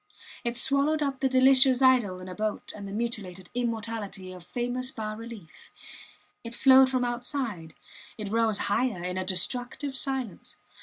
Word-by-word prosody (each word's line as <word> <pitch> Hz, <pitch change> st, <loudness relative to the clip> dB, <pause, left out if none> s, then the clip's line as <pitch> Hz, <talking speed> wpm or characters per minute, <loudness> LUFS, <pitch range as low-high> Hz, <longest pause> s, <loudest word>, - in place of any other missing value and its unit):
It 235 Hz, 0 st, -3 dB
swallowed 280 Hz, +4 st, +1 dB
up 275 Hz, -2 st, -3 dB
the 265 Hz, 0 st, +1 dB
delicious 260 Hz, 0 st, +6 dB
idyll 250 Hz, -8 st, +3 dB
in 185 Hz, -, -9 dB
a 185 Hz, -, -7 dB
boat 215 Hz, +2 st, -4 dB
and 200 Hz, -1 st, -8 dB
the -, -, -8 dB
mutilated 200 Hz, -5 st, -4 dB
immortality 225 Hz, -5 st, -4 dB
of 180 Hz, -1 st, -12 dB
famous 245 Hz, +5 st, -3 dB
bas 215 Hz, -4 st, -5 dB
reliefs. 225 Hz, -6 st, -11 dB, 0.7 s
It 230 Hz, 0 st, -7 dB
flowed 265 Hz, 0 st, +6 dB
from 255 Hz, -1 st, 0 dB
outside 240 Hz, -, -4 dB, 0.4 s
it 210 Hz, -2 st, -6 dB
rose 225 Hz, -2 st, +2 dB
higher, 215 Hz, -3 st, -1 dB
in 180 Hz, +1 st, -3 dB
a -, -, -2 dB
destructive 245 Hz, +9 st, +1 dB
silence. 265 Hz, -7 st, -4 dB
235 Hz, 155 wpm, -27 LUFS, 200-260 Hz, 0.7 s, delicious